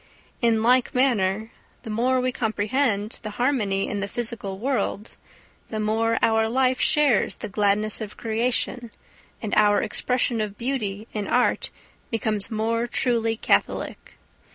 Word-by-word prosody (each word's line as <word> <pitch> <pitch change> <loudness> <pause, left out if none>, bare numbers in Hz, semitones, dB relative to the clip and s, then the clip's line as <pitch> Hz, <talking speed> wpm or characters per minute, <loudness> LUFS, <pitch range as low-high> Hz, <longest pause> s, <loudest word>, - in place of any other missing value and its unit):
In 225 -2 +2
like 250 +2 +3
manner 220 -5 +1 0.3
the 225 - -6
more 250 +4 +1
we 255 0 0
comprehend 220 -1 0
the 215 - -5
harmony 220 -7 +1
in 205 - -3
the 200 - -2
physical 220 -3 -4
world 235 -3 -2 0.6
the 220 - -4
more 225 +2 +1
our 220 0 +3
life 255 +1 +2
shares 290 -8 +3
the - - -6
gladness 210 +2 +1
of 210 -1 -7
creation, 235 +1 -1 0.5
and 215 - -3
our 205 -1 +4
expression 245 -2 0
of 210 -1 -4
beauty 225 -5 -3
in 210 -2 -3
art 250 0 +1 0.4
becomes 215 -2 -1
more 230 +1 -1
truly 230 -2 0
catholic. - - -1
225 Hz, 135 wpm, -24 LUFS, 210-245 Hz, 0.6 s, our